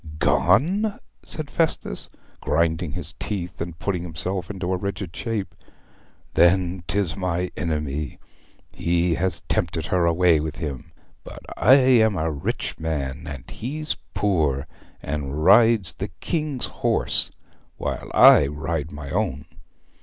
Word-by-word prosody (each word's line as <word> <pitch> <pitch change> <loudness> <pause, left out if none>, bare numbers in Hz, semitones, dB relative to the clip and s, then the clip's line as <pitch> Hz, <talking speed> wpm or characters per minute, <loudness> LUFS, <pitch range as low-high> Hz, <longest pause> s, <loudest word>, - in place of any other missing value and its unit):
'Gone!' 185 - +2 0.2
said 155 -2 -4
Festus, 160 - -1 0.3
grinding 80 +1 0
his - - -6
teeth 90 -5 -4
and 85 -1 -5
putting 90 0 -2
himself 90 +2 -2
into 95 -2 -2
a - - +2
rigid 95 -2 -4
shape. 115 -6 -3 0.8
'Then 90 0 +3
'tis 100 -6 0
my 90 -1 -2
enemy 75 -4 -3 0.5
he 85 0 +1
has 90 +3 -1
tempted 80 -1 -1
her 85 -1 +2
away 85 -1 +4
with 75 0 -4
him! 70 -6 -6 0.3
But - - -10
I 130 - +6
am 125 -6 +5
a 80 0 0
rich 70 -2 -3
man, 70 -4 -3
and 70 -4 -8
he's 150 +6 -3 0.2
poor, 75 -9 +1 0.4
and 75 +1 -3
rides 110 -2 +6
the - - -4
King's 150 -6 -2
horse - - 0 0.5
while - - -4
I 70 - +8
ride 80 +1 -3
my 75 -1 -7
own. 85 -7 -1
85 Hz, 130 wpm, -23 LUFS, 75-100 Hz, 0.8 s, I